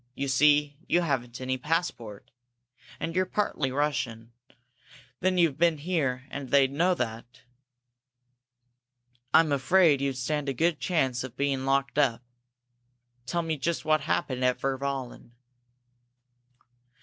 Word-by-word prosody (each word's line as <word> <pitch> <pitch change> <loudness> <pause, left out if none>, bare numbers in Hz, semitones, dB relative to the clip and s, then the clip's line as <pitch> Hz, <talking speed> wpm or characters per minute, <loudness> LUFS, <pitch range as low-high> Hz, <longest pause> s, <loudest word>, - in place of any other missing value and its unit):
You 140 - -3
see, 145 +1 +3
you 175 - +3
haven't 125 -7 -2
any 130 0 -2
passport. 125 - -3 0.7
And 165 +1 -4
you're 185 0 +1
partly 155 -10 -1
Russian. 125 -5 -2 0.9
Then 185 0 +1
you've 160 -5 +2
been 170 -2 +3
here, 145 -6 -1
and 140 -2 -6
they'd 135 -1 +4
know 175 +6 +2
that. 120 0 -5 1.9
I'm 160 +1 +5
afraid 145 +1 +4
you'd 135 -2 -1
stand 145 +2 -2
a - - -1
good 165 +4 +1
chance 130 -8 0
of 130 -1 -9
being 140 -1 -1
locked 135 +1 +1
up. 125 -4 +1 1.0
Tell 170 +3 -1
me 160 -1 -2
just 165 +3 -2
what 155 0 +3
happened 130 -1 -1
at 125 0 +2
Virballen." 135 -3 -4
140 Hz, 125 wpm, -27 LUFS, 130-160 Hz, 1.9 s, I'm